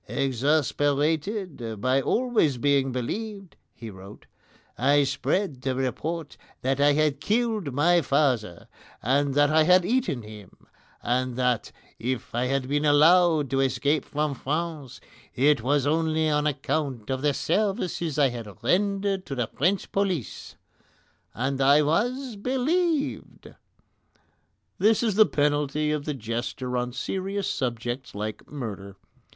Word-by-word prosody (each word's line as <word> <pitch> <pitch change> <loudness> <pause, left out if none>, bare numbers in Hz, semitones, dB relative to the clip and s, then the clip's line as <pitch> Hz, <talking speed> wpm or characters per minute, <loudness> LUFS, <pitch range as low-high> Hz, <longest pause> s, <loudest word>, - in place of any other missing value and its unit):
"Exasperated 145 - 0
by 130 +4 +2
always 225 - +1
being 140 0 +2
believed," 195 - -5 0.2
he 115 -2 -9
wrote, 95 +2 -13 0.5
"I 140 +3 +3
spread 145 0 -1
the 130 -1 -1
report 150 +5 -3 0.3
that 135 +1 0
I 145 0 +5
had 150 -1 +1
killed 215 - 0
my 170 +6 +3
father, 130 - 0 0.4
and 140 +3 +1
that 145 0 +4
I 160 0 +5
had 180 +3 +5
eaten 230 - 0
him, 105 -3 -13 0.4
and 125 +1 0
that 125 -2 0 0.3
if 125 -1 -3
I 120 +2 0
had 135 0 -1
been 145 +2 0
allowed 155 0 +4
to 135 - +1
escape 140 +2 +1
from 150 0 -2
France 150 -1 -4 0.3
it 140 0 +3
was 140 +3 +1
only 160 +1 +1
on 150 0 +1
account 135 -4 -2
of 130 0 -2
the 145 0 +2
services 190 - -1
I 140 -3 +4
had 115 -3 -9
rendered 195 - +1
to 135 - -4
the 120 -2 0
French 185 +7 0
police, 190 - -2 0.8
and 135 +3 -1
I 140 +3 +5
was 240 - -1
BELIEVED!" 285 - -1 1.3
That 215 +4 +3
is 220 -3 +1
the 215 +2 +5
penalty 150 +1 0
of 150 -1 -2
the 150 - -2
jester 120 +2 -4
on 125 0 -1
serious 195 +8 -3
subjects 120 - -3
like 105 +1 -5
murder. 100 -8 -6
145 Hz, 135 wpm, -26 LUFS, 130-175 Hz, 1.3 s, I